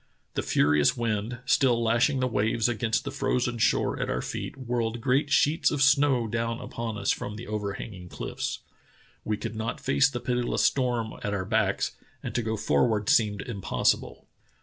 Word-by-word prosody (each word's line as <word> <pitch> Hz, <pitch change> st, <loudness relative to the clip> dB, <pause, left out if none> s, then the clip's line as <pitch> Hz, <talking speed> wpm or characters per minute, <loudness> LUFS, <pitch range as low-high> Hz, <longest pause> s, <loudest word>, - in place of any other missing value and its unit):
The -, -, -1 dB
furious 75 Hz, -, +3 dB
wind, 115 Hz, +1 st, -2 dB
still 125 Hz, -2 st, +3 dB
lashing 120 Hz, +4 st, +2 dB
the 130 Hz, -, +2 dB
waves 110 Hz, 0 st, +1 dB
against 115 Hz, -1 st, 0 dB
the 140 Hz, -, -4 dB
frozen 125 Hz, -3 st, -1 dB
shore -, -, +2 dB
at -, -, -2 dB
our -, -, -1 dB
feet, -, -, -5 dB
whirled 120 Hz, -2 st, -2 dB
great 135 Hz, +4 st, +1 dB
sheets 150 Hz, +2 st, +3 dB
of 145 Hz, -2 st, +1 dB
snow 135 Hz, -3 st, +4 dB
down 115 Hz, +1 st, -2 dB
upon 115 Hz, -2 st, -5 dB
us 100 Hz, -1 st, +1 dB
from 105 Hz, -, -4 dB
the 115 Hz, -, -8 dB
overhanging 100 Hz, -3 st, -5 dB
cliffs. -, -, -4 dB, 0.6 s
We 105 Hz, -1 st, -1 dB
could 115 Hz, +1 st, -5 dB
not 110 Hz, +1 st, -3 dB
face 135 Hz, 0 st, +3 dB
the 125 Hz, -3 st, -4 dB
pitiless 125 Hz, -1 st, 0 dB
storm 120 Hz, -4 st, +1 dB
at 100 Hz, 0 st, -1 dB
our 95 Hz, -2 st, -2 dB
backs, 110 Hz, -2 st, +1 dB, 0.3 s
and -, -, -4 dB
to 120 Hz, -, 0 dB
go 110 Hz, -1 st, -2 dB
for 125 Hz, -, +2 dB
ward 105 Hz, -3 st, -1 dB
seemed 105 Hz, -8 st, +3 dB
impossible. 100 Hz, -6 st, -1 dB
115 Hz, 175 wpm, -27 LUFS, 105-125 Hz, 0.6 s, snow